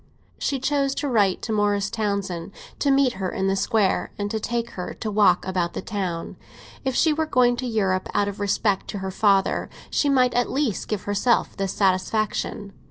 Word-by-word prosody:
She 275 - -1
chose 275 +1 0
to 290 - -2
write 205 -7 +2
to 225 - -3
Morris 205 -1 +1
Townsend 200 -4 -2 0.3
to 285 - +1
meet 270 -2 +4
her 185 - 0
in 190 - -2
the 195 0 +2
Square 195 0 +1
and 205 0 -3
take 235 +2 -2
her 180 - -6
to 215 - -4
walk 210 0 +4
about 180 -2 -1
the - - -4
town. 185 -5 -4 0.5
If 265 -2 -1
she 315 +3 +4
were 315 +1 -1
going 245 -4 +3
to 255 - -3
Europe 195 -5 0
out 205 - +1
of 205 0 -5
respect 205 0 0
to 205 - -5
her 190 - -3
father, 195 0 +2 0.2
she 290 - +2
might 255 -3 +3
at 245 0 +1
least 265 -7 -1
give 210 -3 -3
herself 205 +4 +1
this 195 -2 -2
satisfaction. 200 +1 0
210 Hz, 190 wpm, -24 LUFS, 195-245 Hz, 0.5 s, meet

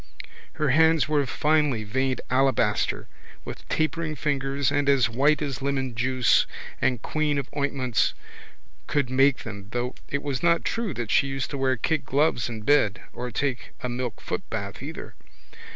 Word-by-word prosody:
Her 150 - 0
hands 160 0 +4
were 150 -1 +2
of 135 - -3
finely 150 -7 +2
veined 130 +5 -1
alabaster 130 -5 +1 0.4
with - - -9
tapering 155 0 -1
fingers 140 -2 0
and 145 -1 +1
as 130 -4 +4
white 145 +5 +3
as 140 -4 -3
lemonjuice 130 -2 +2 0.3
and 125 -3 +1
queen 155 -2 0
of 140 -2 -2
ointments 135 -4 0 0.7
could 140 -4 0
make 135 +1 +3
them 100 -3 -8
though 125 +1 -1 0.2
it 140 0 -2
was 140 -3 -2
not 170 0 +3
true 225 -8 -2
that 120 -3 -3
she 140 - +4
used 135 0 -3
to 140 - -3
wear 130 -1 +2
kid 155 +3 0
gloves 135 -3 +1
in 110 -2 -6
bed 110 -6 +3
or 125 - -4
take 130 +1 -2
a 125 - -1
milk 120 -1 -3
footbath - - -4
either. - - -7
135 Hz, 160 wpm, -25 LUFS, 125-145 Hz, 0.7 s, hands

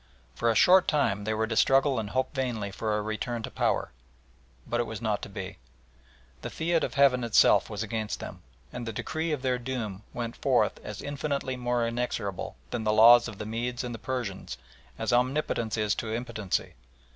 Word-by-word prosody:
For 115 - 0
a 115 - +2
short 185 +7 +6
time 140 -10 +1
they 110 - 0
were 110 +1 +1
to 110 0 -3
struggle 135 +1 +4
and 105 -2 -4
hope 130 +3 -1
vainly 120 -7 -2
for 105 +1 -1
a 105 - -2
return 110 +2 -3
to - - -5
power, - - 0 0.7
but 120 - -1
it 120 - +1
was 110 -2 -5
not 105 -2 -1
to - - -7
be. 95 -1 -7 0.8
The - - -5
fiat 165 0 0
of - - -3
Heaven 135 -3 +4
itself 115 -2 +5
was - - -3
against 110 -2 -3
them, - - -8 0.3
and 120 -1 -5
the 115 - -3
decree 160 +8 -2
of 145 -3 -2
their 125 -1 +1
doom 120 -6 -4
went 115 -1 -4
forth - - +1
as - - -7
infinitely 140 -2 -2
more 120 -1 0
inexorable 115 -5 -3 0.2
than 120 -2 -2
the 105 - +2
laws 120 +3 +8
of 110 -4 -8
the 110 - -5
Medes 120 +3 -3
and 120 -1 -4
the 115 - -7
Persians 120 - -4 0.4
as - - -1
Omnipotence 125 -3 +1
is 105 -1 +1
to 110 - -4
impotency. 110 -4 -2
120 Hz, 195 wpm, -28 LUFS, 110-130 Hz, 0.8 s, laws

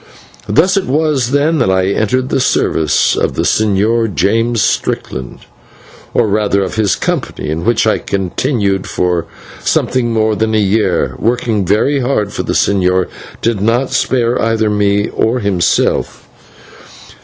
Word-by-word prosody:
Thus 185 +6 +3
it 195 - -1
was, 145 -3 0
then, 145 +3 +1
that 120 - +2
I 95 0 +2
entered 125 +6 0
the - - 0
service 80 - +1
of - - -1
the - - 0
Señor 110 +2 +1
James 115 +7 +1
Strickland, 65 -1 -3 0.7
or 115 - +3
rather 100 -1 +1
of 95 - -4
his 110 -2 +1
company, - - -3
in 80 +2 -3
which 115 -1 +2
I 110 - +2
continued 100 0 -1
for 90 -2 -1 0.4
something 125 -2 0
more 110 -1 +1
than 110 +1 0
a - - +3
year, 105 +2 +1
working 115 -4 0
very 135 +9 +2
hard, 115 -6 -1
for - - -2
the - - -3
señor 95 -2 +1 0.3
did 115 -4 0
not 120 +5 +1
spare 120 -1 0
either 115 -1 +1
me 105 0 +1
or 115 +3 0
himself. 100 -5 0
110 Hz, 145 wpm, -14 LUFS, 100-120 Hz, 0.7 s, Thus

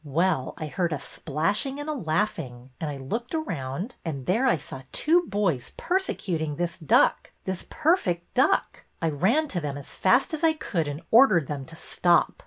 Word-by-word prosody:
Well, 155 -1 0
I 155 - -4
heard 165 +3 -1
a 145 - -2
splashing 165 - -1
and 290 - -5
a 310 - -1
laughing 155 - -2
and 155 - -2
I 145 - -5
looked 225 - -4
around, 180 - -4
and 140 -6 -4
there 230 +9 +2
I 240 - +4
saw 135 -2 -8
two 340 +3 +3
boys 170 -12 -1
persecuting 180 - -1
this 175 +2 -2
duck, 155 -5 +3
this 190 -1 -4
per 320 +3 +3
fect 175 - -2
duck. 265 - +1
I 165 - +1
ran 225 - +2
to 175 - -2
them 145 -2 -3
as 140 - -9
fast 250 +11 +3
as 315 +1 -3
I 325 -1 +5
could 175 - -2
and 145 +4 -5
ordered 220 - +6
them 140 -1 -5
to 165 - -12
stop. 170 0 +2
170 Hz, 190 wpm, -26 LUFS, 150-245 Hz, -, ordered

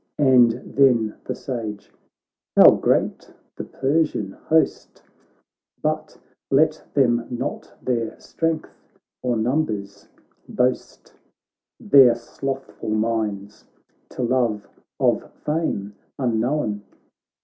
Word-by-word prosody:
And 125 -5 +5 0.2
then 120 -6 +4
the - - -3
Sage: 110 -6 -6 0.3
' - - -68
How - - +10
great - - 0 0.3
ihjE - - -7
Persian 135 -8 0
host! 160 +9 -1 0.8
But - - -2 0.3
let 155 +3 +2
them 120 -4 +2
not 120 - -5
their 115 -3 -2
strength 165 -1 -3 0.5
or 125 -2 0
num 130 +8 +1
bers 100 -2 -7 0.4
boast; 125 +1 -2 0.7
Their 130 -4 +6
slothful 135 +1 -6
minds, 110 -2 -2 0.4
to 125 - -5
love 115 -5 0 0.3
of - - +1
fame 150 -11 -2 0.2
un 120 -5 0
known. 115 -4 -1
120 Hz, 100 wpm, -22 LUFS, 110-135 Hz, 0.8 s, How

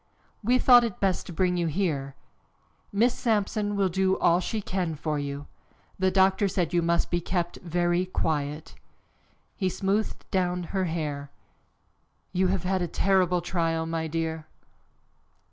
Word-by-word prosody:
"We 245 +4 +4
thought 245 -1 +7
it 230 -5 -3
best 190 -2 0
to - - -7
bring 180 +1 +1
you 170 -1 0
here. 150 -6 -1 0.8
Miss 235 +5 +3
Sampson 210 -2 0
will 200 -1 +2
do 190 +1 +1
all 170 +1 +3
she 215 +4 -2
can 185 -5 -2
for 150 0 -2
you. 140 0 -5 0.5
The 190 0 +3
doctor 190 +1 +3
said 180 -3 -1
you 175 - +3
must 170 0 +1
be 175 0 +1
kept 175 0 -2
very 175 +1 0
quiet." 150 -3 -2 0.8
He 190 -2 0
smoothed 195 +3 -1
down 180 -2 0
her 190 -1 +1
hair. 150 -4 -3 1.0
"You 185 +1 +2
have 185 -2 0
had 185 0 0
a 175 - 0
terrible 180 0 +2
trial, 165 -2 -1
my 165 0 -2
dear." 160 0 -3
180 Hz, 150 wpm, -27 LUFS, 165-190 Hz, 1.0 s, thought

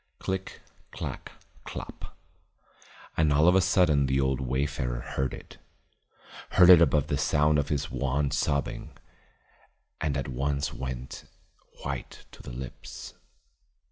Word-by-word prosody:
Click 95 0 -4 0.3
clack - - -6 0.3
clop. - - -8 1.0
And 80 -2 +3
all 75 +3 +4
of 90 - +7
a 95 - +5
sudden 85 -6 +3
the 65 +1 +1
old 65 0 +1
wayfarer 65 -1 -1
heard 65 0 -2
it; - - -11 0.9
heard 90 0 +8
it 85 -2 +9
above 75 -3 +4
the 70 - -1
sound 75 0 +3
of 70 - -2
his 75 -3 -1
won 70 +1 0
sobbing, 70 -1 -2 1.0
and 75 -2 -1
at 70 - -3
once 70 +2 -1
went 65 -1 -6 0.6
white - - -6
to - - -13
the - - -9
lips. 65 +1 -8
70 Hz, 130 wpm, -28 LUFS, 65-75 Hz, 1.0 s, it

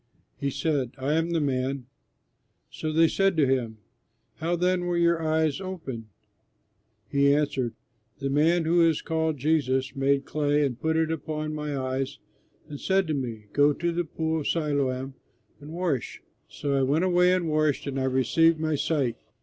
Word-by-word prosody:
He 140 - -2
said, 140 -2 -1
"I 135 +3 -1
am 165 +1 +1
the 170 -1 +1
man." 135 -2 -1 0.9
So 155 - -4
they 165 +1 +5
said 195 0 +1
to 150 - +5
him, 125 -4 0 0.6
"How 170 +2 -1
then 180 +1 +1
were 175 -1 0
your 170 -1 +3
eyes 160 0 +1
opened?" 150 - -6 1.0
He 140 +4 +3
answered, 140 -5 0 0.4
"The 140 -1 -3
man 160 +4 +3
who 170 +2 +3
is 165 -2 +3
called 160 -1 -1
Jesus 135 -2 0
made 135 0 +1
clay 145 -1 +1
and 125 -3 -4
put 160 0 +1
it 160 0 +1
upon 155 0 -3
my 150 -2 -3
eyes, 130 +1 -2 0.5
and 145 -2 -8
said 190 0 +2
to - - +1
me, 120 -6 -4
'Go 145 +1 +4
to 170 +4 -1
the 175 +1 -1
Pool 160 0 -2
of 150 - -4
Siloam 140 -4 -1 0.5
and 145 +1 -11
wash.' 165 -8 -2 0.2
So 140 -1 -3
I 135 - +2
went 145 +7 +2
away 180 0 +4
and 185 -2 +1
washed, 155 -2 +1
and 135 -1 -3
I 130 - 0
received 145 +6 +3
my 155 0 0
sight." 140 -4 0
150 Hz, 175 wpm, -26 LUFS, 135-165 Hz, 1.0 s, they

